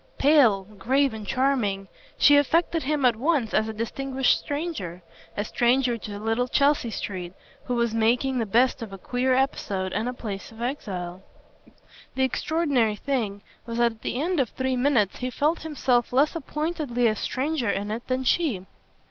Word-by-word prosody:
Pale, 270 -9 +5 0.2
grave 270 +3 +2
and 215 -2 -7
charming, 235 -8 0 0.3
she 290 - +6
affected 330 +3 +2
him 290 -1 0
at 240 -2 +4
once 265 -2 0
as 215 - +2
a - - -3
distinguished 260 +4 0
stranger 285 - -4 0.3
a 205 - -1
stranger 245 +2 +2
to 215 - -8
the 205 - -5
little 225 +3 0
Chelsea 280 -2 +2
street 185 -4 -5 0.3
who 250 - -1
was 235 -2 +1
making 245 +4 +2
the 225 - -1
best 245 +5 +2
of 225 -3 -6
a 195 - -7
queer 250 +6 0
episode 195 -8 -1
and 220 +5 -1
a - - -4
place 205 -5 -6
of 225 - -14
exile. 190 -8 -4 0.9
The 265 - +1
extraordinary 265 -5 +1
thing 210 -5 -2 0.2
was 230 0 -4
that 235 0 +3
at 225 - -17
the 245 - -3
end 340 +2 0
of 260 - +1
three 260 0 -2
minutes 245 -6 +2
he 255 - -3
felt 300 +6 0
himself 265 -6 0
less 280 +6 +3
appointedly 300 -5 -2
a 220 -2 +3
stranger 265 +1 -1
in 205 +1 -2
it 230 +3 -5
than 255 0 -1
she. 255 - +1
245 Hz, 175 wpm, -25 LUFS, 215-275 Hz, 0.9 s, she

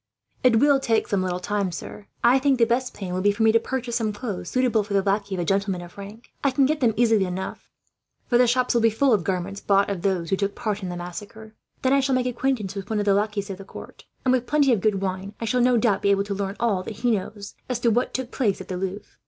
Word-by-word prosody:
"It 250 -2 +5
will 280 +4 +4
take 225 -4 +1
some 200 -2 0
little 180 -1 -2
time, 200 0 -1
sir," 170 - -6
Pierre - - -10
said. 205 - -25 0.3
"I - - +4
think 270 -1 +2
the 235 - +4
best 250 +2 -1
plan 190 -3 -5
will 185 - -1
be 205 +1 +4
for 205 +2 -1
me 220 - +6
to 230 - +4
purchase 245 -1 -3
some 220 -3 -1
clothes, 205 -2 -5
suitable 250 -4 +2
for 200 0 -4
the 195 - +3
lackey 200 0 0
of 180 - -2
a - - -2
gentleman 195 -1 0
of 175 - -13
rank. 205 +4 -11
I 280 - +4
can 270 +1 +3
get 305 +3 0
them 230 -5 +2
easily 225 -4 +3
enough, 185 +1 -6 0.6
for 240 - +2
the 250 - +5
shops 250 +1 +2
will 235 - +2
be 225 - +5
full 245 +4 +2
of 200 -5 +2
garments, 190 +3 -3
bought 200 0 +2
of 190 -3 -4
those 180 -3 -1
who 195 - +2
took 200 0 -2
part 210 -2 -3
in 185 - -4
the 175 - -5
massacre. 205 +5 -8 0.3
Then 260 +1 +3
I 275 - +5
shall 270 -1 +1
make 255 -1 +1
acquaintance 250 -5 -1
with 195 0 -7
one 220 - -1
of 205 - 0
the 200 - +4
lackeys 205 0 -1
of 190 - -7
the - - -8
court 195 - -12 0.2
and, 255 - +4
with 250 -1 +1
plenty 290 -4 +3
of 210 - 0
good 200 -2 +1
wine, 190 +2 -4
I 230 - -3
shall 245 +3 +1
no 250 0 +4
doubt 225 -3 +2
be 200 - +2
able 200 0 +3
to 200 0 -4
learn 200 0 -3
all 215 -6 +1
that 210 +4 -7
he 245 0 +2
knows 205 0 -4 0.2
as 250 -2 -1
to 235 - +3
what 240 +3 +1
took 260 -1 -4
place 210 -7 0
at - - -10
the 185 - -3
Louvre." 190 +2 -4
210 Hz, 290 wpm, -24 LUFS, 195-245 Hz, 0.6 s, me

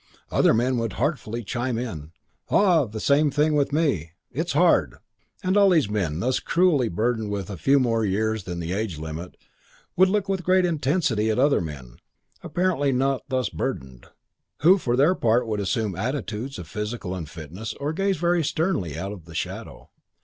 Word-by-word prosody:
Other - - +4
men 125 +3 +1
would 115 -4 -2
heartfully 120 - -2
chime 120 +3 -2
in, 80 -11 -5 0.4
"Ah, 175 - +4
same 145 +6 +3
thing 150 +2 +2
with 145 -1 +1
me. 135 - 0 0.2
It's - - -2
hard." - - +3 0.5
And 185 +1 +1
all 200 -1 +6
these 155 - +3
men, 90 -6 -1
thus 130 +2 +1
cruelly 165 -9 +2
burdened 110 +3 -1
with 100 -1 -4
a - - -4
few 135 - +3
more 115 -3 +1
years 110 +1 -1
than 90 -1 -5
the 85 0 -4
age 100 -5 -2
limit, 80 +3 -7 0.6
would 185 +1 +5
look 205 0 0
with 195 -1 -1
great 185 +1 +3
intensity 145 - +1
at 110 - 0
other 140 -2 +3
men, 70 -7 -8 0.4
apparently 175 -6 0
not 135 +1 0
thus 130 -5 0
burdened, 65 -2 -5 0.5
who 185 +5 +6
for 120 -7 0
their 145 +8 +4
part 120 -6 +2
would 110 -2 -2
assume 105 -1 -1
attitudes 125 - -3
of - - -8
physical 105 -3 -4
unfitness 85 +4 -7
or 145 +2 -3
gaze 195 +2 0
very 175 0 +1
sternly 145 - -1
out 95 +4 -4
of 95 -6 -10
the 80 -1 -7
window. - - -10
120 Hz, 175 wpm, -24 LUFS, 100-150 Hz, 0.6 s, all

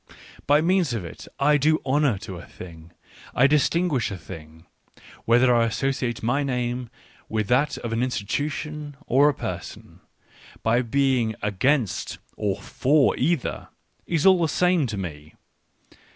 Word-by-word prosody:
By 145 +1 +5
means 175 -5 +2
of 100 -6 -4
it, 85 - -10
I 150 +1 +4
do 155 +2 +2
honour 140 -4 +2
to 95 - -7
a - - -11
thing, 85 -2 -12 0.4
I 125 - +5
dis 145 0 +4
tinguish 165 -10 0
a 100 - -5
thing; 80 -1 -12 0.6
whether 120 +2 +4
I 115 -1 +3
associate 125 -1 -2
my 120 +5 +1
name 125 -2 -2 0.4
with 110 -2 -1
that 140 +3 +2
of 115 -1 -5
an 115 - 0
institution 145 +5 -3
or 140 +4 +4
a - - 0
person, - - -7 0.6
by 115 +2 +3
being 125 -2 +1
against 110 - 0 0.2
ox 100 -1 -3
for 140 +1 +3
either, 155 0 -1 0.4
is 165 -1 0
all 190 -2 +6
the 160 - +1
same 180 -3 +2
to 110 -3 -5
me. 75 -5 -7
125 Hz, 150 wpm, -24 LUFS, 110-145 Hz, 0.6 s, all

